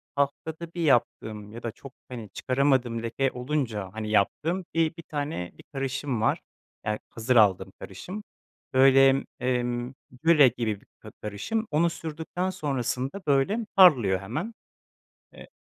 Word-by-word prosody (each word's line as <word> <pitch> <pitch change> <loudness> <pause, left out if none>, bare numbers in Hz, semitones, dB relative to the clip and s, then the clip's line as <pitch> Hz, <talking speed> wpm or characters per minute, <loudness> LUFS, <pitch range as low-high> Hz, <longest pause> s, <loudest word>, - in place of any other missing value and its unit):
haftada 160 +4 -2
1 175 - -4
yaptığım 110 -6 +1
ya 115 +2 -9
da 115 - -2
çok, 130 +3 -13 0.2
hani, 115 -4 -7
çıkaramadığım 130 -3 +1
leke 130 +3 0
olunca, 125 -7 -2
hani, 110 -1 -4
yaptığım 160 - +1
bir 165 -1 +1
1 165 - -9
tane 145 - -4
bir - - -14
karışım 135 -3 -2
var. 110 - +2 0.5
Ya, 105 0 -1
hazır 115 +3 -1
aldığım 95 -4 +4
karışım. 185 - -7 0.5
Böyle, 135 +1 +6 0.2
emm, 125 0 -1 0.3
jöle 155 -5 +7
gibi 110 -4 -1
bir - - -24
ka - - -12
karışım. 215 - -3
Onu 165 +3 +3
sürdükten 165 +3 -4
sonrasında, 135 - -2
böyle, 145 +12 +2
parlıyor 125 - +6
hemen. 155 - -4 0.8
Eee - - -13
135 Hz, 140 wpm, -27 LUFS, 115-155 Hz, 0.8 s, jöle